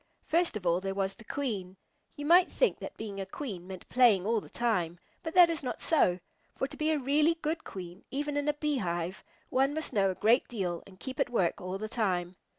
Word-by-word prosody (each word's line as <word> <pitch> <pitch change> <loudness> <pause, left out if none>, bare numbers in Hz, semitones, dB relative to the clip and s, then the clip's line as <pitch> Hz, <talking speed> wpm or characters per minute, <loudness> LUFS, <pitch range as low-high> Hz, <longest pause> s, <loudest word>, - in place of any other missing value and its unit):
First 335 -7 +2
of 190 - -10
all, 175 +1 +2
there 195 0 -3
was 195 0 0
the 230 - -14
Queen. 205 -8 -3 0.4
You 290 - -6
might 350 +3 +6
think - - +2
that - - -8
being 205 -3 -5
a - - -3
Queen 195 -11 -6
meant 190 -1 -9
playing 230 -7 +5
all 225 0 +1
the - - -13
time, 180 -8 0 0.2
but 325 - -5
that 350 -2 +8
is 325 - -2
not 255 - -4
so, 185 - +3 0.4
for - - -1
to 275 - -7
be 305 0 0
a 315 - +3
really 295 +4 +3
good 320 0 -3
Queen, 180 0 -8
even 290 +1 -2
in 290 0 0
a 295 - +3
Beehive, 190 - -2 0.3
one 270 +3 +2
must 315 - -3
know 195 -2 +3
a 185 - -2
great 225 +7 +3
deal 185 -7 -3
and 190 -1 -16
keep 260 -1 -6
at - - +2
work 190 -8 +1
all 185 +1 -3
the 215 +2 -4
time. 185 -6 -1
225 Hz, 230 wpm, -30 LUFS, 185-290 Hz, 0.4 s, that